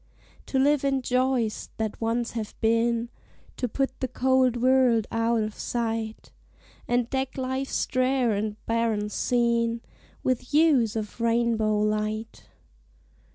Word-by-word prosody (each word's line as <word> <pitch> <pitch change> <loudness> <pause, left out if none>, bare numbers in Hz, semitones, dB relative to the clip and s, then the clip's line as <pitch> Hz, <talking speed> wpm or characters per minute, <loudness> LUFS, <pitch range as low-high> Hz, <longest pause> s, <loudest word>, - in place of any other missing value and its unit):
To 270 - -1
live 280 +1 +3
in 270 -2 +1
joys 250 -3 0
that 220 0 -3
once 230 +1 -1
have 220 -3 -6
been, 230 +1 +1 0.5
To 250 - -1
put 265 +2 -2
the 260 - -1
cold 255 -1 +2
world 250 -3 +4
out 230 0 +1
of 215 0 -4
sight, 225 -2 -3 0.6
And 245 -1 +1
deck 265 +1 -3
life's 260 +1 -1
drear 255 -2 +1
and 210 +1 -1
barren 225 -2 0
scene 235 0 +1 0.4
With 255 -2 +1 0.2
hues 280 -9 +4
of 220 +1 -5
rainbow 230 -2 +2
light. 215 +1 -2
235 Hz, 125 wpm, -26 LUFS, 225-255 Hz, 0.6 s, world